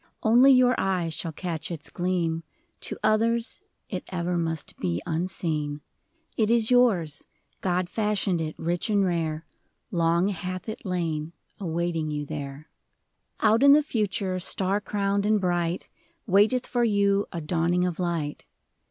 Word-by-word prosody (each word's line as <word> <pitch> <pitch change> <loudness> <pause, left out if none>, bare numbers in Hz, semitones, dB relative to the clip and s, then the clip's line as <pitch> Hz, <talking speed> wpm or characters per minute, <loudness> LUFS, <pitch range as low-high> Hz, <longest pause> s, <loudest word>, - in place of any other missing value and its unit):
Only 245 +5 +6
your 255 -1 +5
eye 185 -3 0
shall 160 +1 -3
catch 165 -1 -4
its 165 -2 -6
gleam; 175 -2 -1 0.4
To - - -4
others, 230 +2 +2 0.3
it - - -4
ever 180 -1 -2
must 165 -3 -3
be 85 -1 -1
unseen. 155 -3 -2 0.5
It 220 -2 +2
is 230 0 +3
yours 205 - +3 0.2
— - - -43
God 180 0 +1
fashioned 205 -4 0
it 155 -1 -4
rich 175 +5 -1
and 200 -2 +3
rare. 165 -3 -1 0.5
Long 170 +2 +2
hath 185 0 -5
it 215 -2 -6
lain 165 -3 -2 0.3
awaiting 170 -3 -1
you 150 -1 -3
there. 145 0 -6 0.7
Out 220 +2 +4
in 280 0 +8
the 300 +1 +5
Future, 200 -7 -1
star 190 +2 0
crowned 200 -1 0
and 210 0 +3
bright, 175 -2 -1 0.4
Waiteth 220 +5 +3
for 245 -1 0
you 200 -2 +2
a 170 - -4
dawning 170 +2 +1
of 180 -1 -3
light. 170 -5 -2
180 Hz, 145 wpm, -26 LUFS, 165-210 Hz, 0.7 s, in